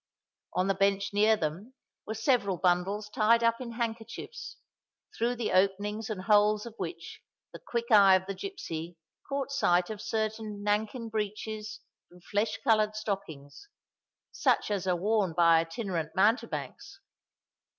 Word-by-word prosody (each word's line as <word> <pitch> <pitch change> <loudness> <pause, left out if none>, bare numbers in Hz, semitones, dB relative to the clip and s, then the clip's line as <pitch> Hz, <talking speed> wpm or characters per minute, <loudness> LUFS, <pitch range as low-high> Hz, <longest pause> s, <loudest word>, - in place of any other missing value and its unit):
On 185 - +1
the 195 - +2
bench 195 +1 +1
near 215 +2 +4
them 185 +10 -4 0.3
were 220 - -3
several 220 -5 +1
bundles 185 +4 +1
tied 225 +2 +3
up 230 +1 +2
in 235 -2 -6
handkerchiefs, 230 - -5 0.6
through 240 +2 0
the 235 -2 -2
openings 205 +3 +1
and 195 -4 -4
holes 210 +1 +3
of 235 - -8
which 170 -2 -7 0.3
the - - -9
quick 235 0 -4
eye 200 -3 +8
of 185 0 0
the 195 - -4
gipsy 175 - -6 0.3
caught 275 -1 -2
sight 180 -9 +2
of 210 -1 -6
certain 215 -1 -3
nankin 220 +3 -1
breeches 215 0 -4 0.3
and 175 0 -18
flesh 205 +2 -1
coloured 215 -4 +3
stockings, 195 - -6 0.6
such - - +1
as 195 -3 -2
are 180 - +2
worn 200 -1 +1
by 170 -1 +5
itinerant 165 -1 -3
mountebanks. 210 +6 -1
210 Hz, 140 wpm, -29 LUFS, 185-225 Hz, 0.6 s, eye